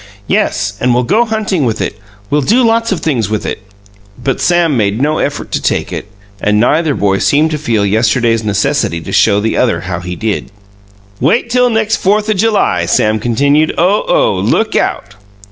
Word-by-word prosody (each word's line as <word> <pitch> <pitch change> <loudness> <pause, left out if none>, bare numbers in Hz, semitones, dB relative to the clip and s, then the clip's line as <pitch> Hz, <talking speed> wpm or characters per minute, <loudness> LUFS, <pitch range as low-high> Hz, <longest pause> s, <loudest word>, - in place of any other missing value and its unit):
"Yes, 105 +1 0
and 125 -1 +1
we'll 125 - +1
go 220 - +2
huntin' 215 -7 -1
with 115 -3 -1
it. - - -3 0.4
We'll 145 +1 +2
do 235 - +2
lots 230 0 +1
of 190 - -2
things 120 - -1
with 110 -1 -2
it!" - - -4 0.6
But 130 +1 -2
Sam 175 -4 +2
made 105 -1 0
no 150 +3 0
effort 145 - -3
to - - -1
take - - -1
it, - - -5 0.3
and 105 0 +2
neither 150 +6 +2
boy 100 -1 0
seemed 155 +3 +2
to 155 - -2
feel 115 -8 0
yesterday's 115 +2 +1
necessity 105 - 0
to - - -8
show 100 -2 +3
the 110 +2 -1
other 115 -9 +1
how 90 -1 -4
he 90 0 -6
did. 110 +2 -3 0.7
"Wait 230 - +1
till 250 0 +3
next 220 -1 0
Fourth 210 +3 +1
o' - - +3
July!" 215 +2 +1
Sam 110 0 +1
continued. 140 +7 +1
"Oh, 185 +5 +2
oh! - - +2
Look 220 0 0
out!" 95 - -1
140 Hz, 190 wpm, -13 LUFS, -, 0.7 s, show